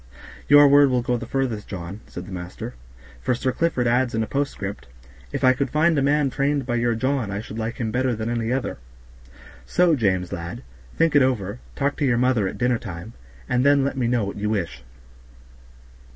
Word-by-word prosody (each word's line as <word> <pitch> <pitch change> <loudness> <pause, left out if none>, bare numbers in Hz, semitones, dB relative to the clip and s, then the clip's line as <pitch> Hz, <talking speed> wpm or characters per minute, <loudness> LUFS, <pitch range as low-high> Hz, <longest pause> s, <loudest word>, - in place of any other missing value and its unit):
"Your 145 0 +8
word 140 0 +6
will 125 -2 +1
go 125 0 0
the 115 -1 -5
furthest, 125 -6 -2
John," 95 +1 -6
said 90 - -8
the 95 - -11
master, 95 +6 -6 0.5
"for 125 - +1
Sir 130 +2 -1
Clifford 160 -5 0
adds 120 0 +2
in 110 - +1
a - - -1
postscript, 110 - -3 0.4
'If - - -3
I 130 0 +6
could 135 +1 -2
find 160 +4 +3
a 140 - +2
man 145 0 +2
trained 140 0 0
by 120 - -2
your 120 0 +1
John 130 -1 0
I 100 0 -3
should 110 +1 -7
like 115 +1 -3
him 110 -3 -2
better 125 +1 0
than 110 +1 -4
any 115 -1 -1
other;' 130 - -2 0.8
so, 175 -3 +3
James, 95 - 0
lad, 85 0 -6 0.3
think 165 -2 +2
it 145 - +7
over, 115 -4 0 0.2
talk 140 0 -1
to 145 - 0
your 125 -3 +2
mother 125 -5 +2
at - - -5
dinner 125 -2 +1
time, 90 +4 -8 0.3
and 125 0 +1
then 140 0 +4
let 140 0 -1
me 125 -3 0
know 120 -2 +1
what 100 - -6
you 105 +1 -1
wish." 100 - -3
125 Hz, 210 wpm, -23 LUFS, 110-135 Hz, 0.8 s, Your